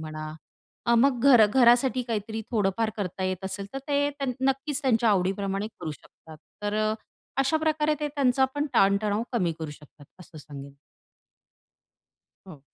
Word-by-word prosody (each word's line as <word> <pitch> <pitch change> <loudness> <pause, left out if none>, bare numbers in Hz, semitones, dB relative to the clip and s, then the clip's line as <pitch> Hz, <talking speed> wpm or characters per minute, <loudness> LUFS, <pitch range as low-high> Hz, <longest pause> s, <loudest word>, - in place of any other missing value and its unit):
म्हणा. 155 0 -6 0.5
अ, 235 - +4
मग 250 0 +3
घरा 225 -4 +8
घरासाठी 245 +2 +4
काहीतरी 220 -1 -4
थोडंफार 215 0 0
करता 190 -2 -3
येत 185 0 -3
असेल, 195 +1 -4
तर 270 - -4
ते 285 0 +2
त्यां 275 -2 -3 0.2
नक्कीच 275 +2 -1
त्यांच्या 230 -3 +3
आवडीप्रमाणे 195 +1 0
करू 155 - -4
शकतात. 155 +2 -15 0.3
तर 205 0 -1 0.2
अ, - - -1 0.5
अशाप्रकारे 310 +1 +1
ते 295 - -1
त्यांचा 265 -2 +2
पण 290 +1 -1
ताणतणाव 200 +2 +3
कमी 180 -8 +1
करू 160 -2 -5
शकतात, 150 -1 -15
असं 165 -3 -13
सांगेन. 140 -1 -10 1.7
हो. 150 -6 -11
215 Hz, 145 wpm, -26 LUFS, 185-265 Hz, 1.7 s, घरा